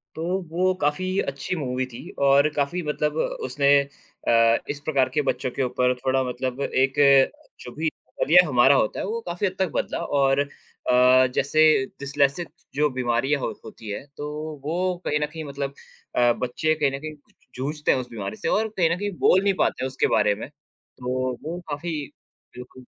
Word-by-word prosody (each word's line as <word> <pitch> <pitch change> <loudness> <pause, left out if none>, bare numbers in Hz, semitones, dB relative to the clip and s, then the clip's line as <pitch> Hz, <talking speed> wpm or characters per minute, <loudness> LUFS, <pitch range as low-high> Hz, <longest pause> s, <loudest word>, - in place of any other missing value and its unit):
तो 160 - -4 0.3
वो 185 +2 +2
काफ़ी 185 +6 0
अच्छी 140 +6 -3
मूवी 130 -5 -2
थी 125 -2 -10 0.2
और 140 +2 +5
काफ़ी 150 +5 0
मतलब 150 +1 -1 0.3
उसने 140 +2 0 0.6
अ, 115 0 +5
इस 145 - -3
प्रकार 135 -4 +2
के 150 - +2
बच्चों 130 -2 -2
के 135 - -2
ऊपर 125 0 +1
थोड़ा 130 +1 0
मतलब 130 +1 -4
एक 135 -1 +1 0.7
जो 125 - -9
भी 160 - -3
नज़रिया 180 +3 +3
हमारा 135 0 +5
होता 110 - +1
है - - -2
वो 220 +4 -3
काफ़ी 175 +4 -2
हद 185 - -5
तक 190 - +1
बदला। - - -1
और 135 -1 +2
अ, 130 -2 +2
जैसे 155 0 +4
डिस्लेक्सिस 140 +4 0 0.3
जो 150 +1 +2
बीमारियाँ 130 +2 0
हो - - -2
होती 110 - -10
है 105 - -5
तो 145 - -4 0.4
वो 180 +4 -1
कहीं 150 - +1
न 150 - +1
कहीं 160 +1 -8
मतलब 140 -1 -5 0.4
अ, 120 -1 +4
बच्चे 140 +7 -1
कहीं 145 -3 +1
न - - -10
कहीं 155 +1 -6 0.4
जूझते 150 +4 -1
हैं 130 - +2
उस 125 - -6
बीमारी 100 -3 -5
से - - -4
और 220 +1 +2
कहीं 170 -3 +3
न - - -9
कहीं 205 0 -2
बोल 190 +1 +4
नहीं 200 - +3
पाते - - +1
उसके 130 - 0
बारे 105 -1 +2
में, 110 - -8
तो 130 -3 -5
वो 170 +3 -4
काफ़ी 155 +2 -3 0.6
बिल्कुल। 125 +1 -11
140 Hz, 185 wpm, -24 LUFS, 130-155 Hz, 0.7 s, और